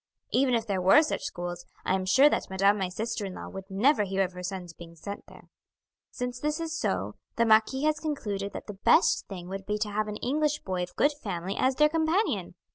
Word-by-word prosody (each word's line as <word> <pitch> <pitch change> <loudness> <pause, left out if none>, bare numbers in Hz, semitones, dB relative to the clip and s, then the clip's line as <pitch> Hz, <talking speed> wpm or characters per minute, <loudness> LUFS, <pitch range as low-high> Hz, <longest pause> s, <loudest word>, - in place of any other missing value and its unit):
Even 255 -1 +3
if 225 -1 0
there 195 -4 -1
were 195 - +7
such 310 - -2
schools, 175 -1 -5 0.2
I - - +1
am 190 -1 -1
sure 265 +9 +6
that - - 0
madame 195 +2 +3
my 190 -2 -1
sister 220 +3 -3
in 190 -2 -5
law - - -7
would 195 0 -9
never 215 +7 +3
hear 195 0 0
of 185 -1 -4
her 180 - -8
sons 180 -2 -5
being 170 0 -12
sent 200 +5 -8
there. - - -15 0.7
"Since 250 -1 -4
this 300 +4 -1
is 325 -1 -3
so, - - -2 0.2
the 235 - +3
marquis 220 +5 +4
has 305 0 +2
concluded 205 -11 -3
that - - -7
the 210 - -7
best - - +4
thing 180 -3 -8
would 195 0 -6
be 210 - 0
to 210 0 -2
have 215 +1 -1
an 210 - -4
English 295 +4 0
boy 185 -2 -2
of 180 0 -5
good 290 - +3
family 190 -2 -3
as 260 0 +2
their 300 +2 +5
companion. 325 +6 0
210 Hz, 230 wpm, -28 LUFS, 190-270 Hz, 0.7 s, were